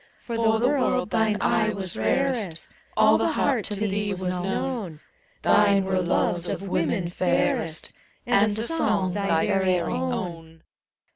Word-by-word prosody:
For 235 Hz, -, -6 dB
the 225 Hz, +1 st, +2 dB
world 255 Hz, -4 st, 0 dB
thine 220 Hz, -2 st, +1 dB
eye 215 Hz, -1 st, +1 dB
was 190 Hz, -3 st, -5 dB
rarest. 245 Hz, -11 st, -1 dB, 0.3 s
All -, -, +5 dB
the -, -, +1 dB
heart 260 Hz, -7 st, +1 dB
to 210 Hz, -, -4 dB
thee 205 Hz, -1 st, -1 dB
was 180 Hz, -1 st, -2 dB
known: 195 Hz, -, -3 dB, 0.4 s
Thine 200 Hz, -2 st, +4 dB
were 190 Hz, -1 st, 0 dB
loves 175 Hz, 0 st, 0 dB
of 195 Hz, -, -4 dB
women 175 Hz, -1 st, -1 dB
fairest, 180 Hz, -, -1 dB, 0.3 s
And 215 Hz, -3 st, +3 dB
a 220 Hz, -, -1 dB
song 215 Hz, -, +1 dB
thy 195 Hz, -5 st, +1 dB
very 190 Hz, -3 st, +2 dB
own. 165 Hz, -, -4 dB
200 Hz, 140 wpm, -25 LUFS, 180-220 Hz, 0.4 s, All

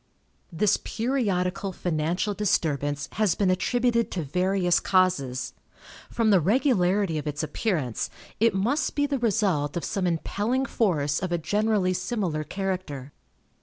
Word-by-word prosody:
This 205 Hz, +5 st, +2 dB
periodical 200 Hz, -6 st, -1 dB
financial 175 Hz, +3 st, -1 dB
disturbance 145 Hz, -8 st, 0 dB
has 210 Hz, -6 st, +1 dB
been 195 Hz, -3 st, +2 dB
attributed 235 Hz, +5 st, +1 dB
to 175 Hz, -, -3 dB
various 180 Hz, +4 st, +1 dB
causes. 180 Hz, -10 st, +1 dB, 0.6 s
From 225 Hz, -2 st, +1 dB
the 195 Hz, -, +6 dB
regularity 195 Hz, -, +2 dB
of 150 Hz, -, -6 dB
its 150 Hz, +1 st, -2 dB
appearance, 155 Hz, -, -2 dB, 0.3 s
it 225 Hz, -2 st, +3 dB
must 240 Hz, +11 st, 0 dB
be 285 Hz, -, +2 dB
the 280 Hz, -2 st, -1 dB
result 190 Hz, -10 st, +1 dB
of 170 Hz, -, -3 dB
some 190 Hz, -2 st, -1 dB
impelling 210 Hz, +9 st, -1 dB
force 150 Hz, -, 0 dB
of 185 Hz, -2 st, -3 dB
a 175 Hz, -, +2 dB
generally 205 Hz, +2 st, +1 dB
similar 180 Hz, -4 st, -2 dB
character. 180 Hz, -7 st, -4 dB
185 Hz, 130 wpm, -26 LUFS, 160-215 Hz, 0.6 s, the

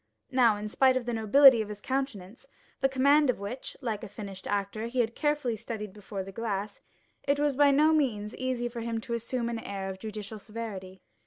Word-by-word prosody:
Now, 240 Hz, -5 st, +4 dB
in 210 Hz, +1 st, -5 dB
spite 260 Hz, +4 st, +3 dB
of 250 Hz, -, -3 dB
the 240 Hz, -, -2 dB
nobility 230 Hz, +3 st, +7 dB
of 215 Hz, -, -5 dB
his 210 Hz, -1 st, -7 dB
countenance, 245 Hz, -3 st, -4 dB, 0.3 s
the 270 Hz, -, +2 dB
command 280 Hz, +2 st, +4 dB
of 250 Hz, -, +2 dB
which, 215 Hz, +6 st, -6 dB
like 220 Hz, -4 st, -3 dB
a -, -, -5 dB
finished 195 Hz, -2 st, -8 dB
actor, 205 Hz, +2 st, -2 dB
he 250 Hz, +2 st, -3 dB
had 230 Hz, -1 st, +1 dB
carefully 295 Hz, -5 st, 0 dB
studied 210 Hz, -2 st, -6 dB
before 200 Hz, -1 st, -6 dB
the 195 Hz, -, -9 dB
glass, 205 Hz, -1 st, -4 dB, 0.4 s
it 280 Hz, 0 st, +1 dB
was 290 Hz, -2 st, +1 dB
by 285 Hz, +1 st, +5 dB
no 300 Hz, +3 st, +5 dB
means 225 Hz, -9 st, 0 dB
easy 255 Hz, -2 st, -2 dB
for 240 Hz, 0 st, -6 dB
him 230 Hz, 0 st, -2 dB
to 235 Hz, +1 st, -5 dB
assume 235 Hz, +1 st, -2 dB
an 235 Hz, -1 st, -3 dB
air 195 Hz, -3 st, -5 dB
of 190 Hz, -, -9 dB
judicial 215 Hz, 0 st, -7 dB
severity. 200 Hz, -4 st, -7 dB
230 Hz, 210 wpm, -29 LUFS, 205-260 Hz, 0.4 s, nobility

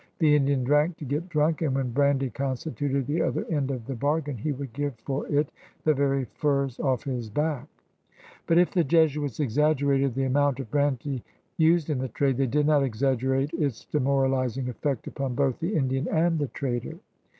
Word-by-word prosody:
The 155 Hz, -3 st, +4 dB
Indian 140 Hz, -2 st, +2 dB
drank 150 Hz, +5 st, +2 dB
to 150 Hz, -, -7 dB
get 150 Hz, +7 st, -3 dB
drunk, 155 Hz, 0 st, +1 dB
and 145 Hz, -5 st, +1 dB
when 130 Hz, -2 st, -1 dB
brandy 135 Hz, 0 st, +2 dB
constituted 140 Hz, 0 st, -2 dB
the 155 Hz, +6 st, 0 dB
other -, -, -1 dB
end 145 Hz, -4 st, 0 dB
of 125 Hz, -4 st, -4 dB
the 135 Hz, -, -4 dB
bargain 145 Hz, +3 st, -1 dB
he 125 Hz, +7 st, -2 dB
would 135 Hz, -3 st, -6 dB
give 145 Hz, -1 st, -2 dB
for 135 Hz, +5 st, -4 dB
it 145 Hz, 0 st, +1 dB, 0.3 s
the 155 Hz, -, +4 dB
very 135 Hz, -1 st, +1 dB
furs 140 Hz, 0 st, -1 dB
off 130 Hz, -2 st, 0 dB
his 125 Hz, -5 st, -4 dB
back. 150 Hz, +2 st, -1 dB, 0.8 s
But 165 Hz, -, +4 dB
if 175 Hz, 0 st, +4 dB
the 175 Hz, -3 st, +2 dB
Jesuits 150 Hz, -4 st, +2 dB
exaggerated 140 Hz, -1 st, +2 dB
the 135 Hz, -, 0 dB
amount 140 Hz, 0 st, +2 dB
of 120 Hz, -5 st, -6 dB
brandy 140 Hz, -3 st, 0 dB, 0.3 s
used 160 Hz, -1 st, +3 dB
in 140 Hz, -, 0 dB
the 130 Hz, -, -2 dB
trade, 135 Hz, +2 st, 0 dB
they 135 Hz, -1 st, +2 dB
did 150 Hz, +4 st, +1 dB
not 150 Hz, -1 st, +4 dB
exaggerate 135 Hz, +3 st, 0 dB
its 145 Hz, -9 st, -2 dB
demoralizing 135 Hz, -2 st, 0 dB
effect 135 Hz, +1 st, -2 dB
upon 135 Hz, -3 st, -3 dB
both 135 Hz, 0 st, +1 dB
the 175 Hz, +6 st, -2 dB
Indian 135 Hz, +1 st, 0 dB
and 165 Hz, 0 st, +2 dB
the 145 Hz, -, 0 dB
trader. 130 Hz, +4 st, -4 dB
140 Hz, 185 wpm, -26 LUFS, 130-150 Hz, 0.8 s, The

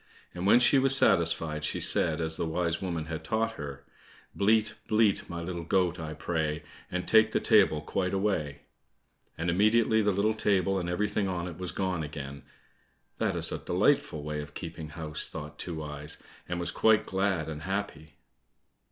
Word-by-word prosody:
And 90 Hz, +2 st, -3 dB
when 115 Hz, -, +7 dB
she 135 Hz, +3 st, +5 dB
was 135 Hz, 0 st, +7 dB
satisfied, 80 Hz, -, +2 dB
she -, -, -1 dB
said, 80 Hz, 0 st, +3 dB
as 80 Hz, 0 st, -1 dB
the 80 Hz, -, -2 dB
wise 85 Hz, 0 st, -1 dB
woman 85 Hz, -4 st, -3 dB
had 80 Hz, 0 st, -6 dB
taught 115 Hz, 0 st, 0 dB
her, 70 Hz, -7 st, -8 dB, 0.5 s
"Bleat, 110 Hz, +2 st, +2 dB
bleat, 105 Hz, -2 st, +2 dB
my 85 Hz, -1 st, -5 dB
little 85 Hz, 0 st, -5 dB
goat, 90 Hz, 0 st, +1 dB
I 80 Hz, -1 st, -6 dB
pray, 80 Hz, -1 st, -2 dB, 0.3 s
And 90 Hz, 0 st, -4 dB
take 110 Hz, 0 st, +5 dB
the -, -, +2 dB
table 95 Hz, -8 st, +4 dB
quite 90 Hz, +4 st, -2 dB
away," 80 Hz, -8 st, -1 dB, 0.8 s
and 85 Hz, -, -3 dB
immediately 110 Hz, +5 st, +3 dB
the 105 Hz, -, +1 dB
little 100 Hz, +3 st, +1 dB
table 95 Hz, -3 st, +1 dB
and 85 Hz, -1 st, -4 dB
everything 105 Hz, +2 st, -1 dB
on 90 Hz, -1 st, -3 dB
it 85 Hz, -1 st, -9 dB
was 90 Hz, -3 st, -3 dB
gone 95 Hz, 0 st, -2 dB
again. 70 Hz, -2 st, -7 dB, 0.8 s
"That -, -, 0 dB
is -, -, -1 dB
a -, -, -3 dB
delightful 75 Hz, -2 st, +1 dB
way 75 Hz, 0 st, -4 dB
of 75 Hz, 0 st, -11 dB
keeping 80 Hz, -3 st, -7 dB
house!" 75 Hz, -1 st, -2 dB
thought 75 Hz, 0 st, -8 dB
Two 80 Hz, -3 st, -5 dB
eyes, 75 Hz, +1 st, -5 dB, 0.3 s
and 90 Hz, -1 st, -2 dB
was 85 Hz, -, -1 dB
quite 110 Hz, -1 st, +3 dB
glad 95 Hz, -4 st, -1 dB
and 75 Hz, -1 st, -6 dB
happy. 80 Hz, -5 st, -5 dB
85 Hz, 180 wpm, -28 LUFS, 75-100 Hz, 0.8 s, when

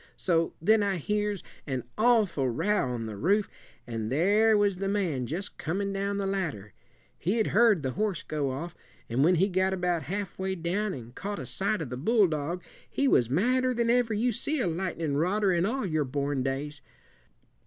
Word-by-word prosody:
So 165 Hz, -2 st, +1 dB
then 215 Hz, +6 st, +4 dB
I 200 Hz, -1 st, +1 dB
hears 210 Hz, +3 st, -1 dB, 0.2 s
an 130 Hz, -3 st, -2 dB
awful 215 Hz, -, +3 dB
row 165 Hz, -, +1 dB
on 120 Hz, -2 st, -3 dB
the 110 Hz, -1 st, -6 dB
roof, 200 Hz, -, +2 dB, 0.4 s
and 115 Hz, -2 st, -4 dB
there 210 Hz, +9 st, +4 dB
was 205 Hz, -2 st, +2 dB
the 195 Hz, +1 st, -2 dB
man 175 Hz, -11 st, -1 dB
just 185 Hz, -, -5 dB
coming 195 Hz, +5 st, -2 dB
down 200 Hz, +1 st, -1 dB
the 200 Hz, -, -1 dB
ladder. 160 Hz, -, -3 dB, 0.5 s
He'd 215 Hz, +5 st, +1 dB
heard 215 Hz, -7 st, +5 dB
the 130 Hz, -, -1 dB
horse 200 Hz, 0 st, -1 dB
go 145 Hz, -3 st, -2 dB
off, 165 Hz, +7 st, -5 dB, 0.3 s
and 120 Hz, +4 st, +2 dB
when 180 Hz, +4 st, +5 dB
he 185 Hz, +4 st, +3 dB
got 190 Hz, 0 st, +1 dB
about 180 Hz, -2 st, 0 dB
half 195 Hz, +2 st, -5 dB
way 190 Hz, 0 st, -1 dB
down 185 Hz, +4 st, -1 dB
an' 120 Hz, -2 st, -9 dB
caught 200 Hz, +9 st, -5 dB
a -, -, -5 dB
sight 200 Hz, -2 st, -1 dB
of 130 Hz, -, -8 dB
the 125 Hz, -, -4 dB
bulldog, 175 Hz, -, +1 dB, 0.3 s
he 280 Hz, -, +1 dB
was 120 Hz, -, +3 dB
madder 250 Hz, -, +2 dB
than 235 Hz, 0 st, +2 dB
ever 240 Hz, -3 st, +2 dB
you 240 Hz, +4 st, +1 dB
seed 285 Hz, +6 st, -1 dB
a -, -, +1 dB
lightnin 165 Hz, -4 st, -2 dB
rodder 190 Hz, +4 st, +2 dB
in 170 Hz, +3 st, +2 dB
all 260 Hz, +1 st, -1 dB
your 155 Hz, -4 st, 0 dB
born 140 Hz, +1 st, -1 dB
days. 140 Hz, +2 st, -3 dB
185 Hz, 190 wpm, -28 LUFS, 145-205 Hz, 0.5 s, heard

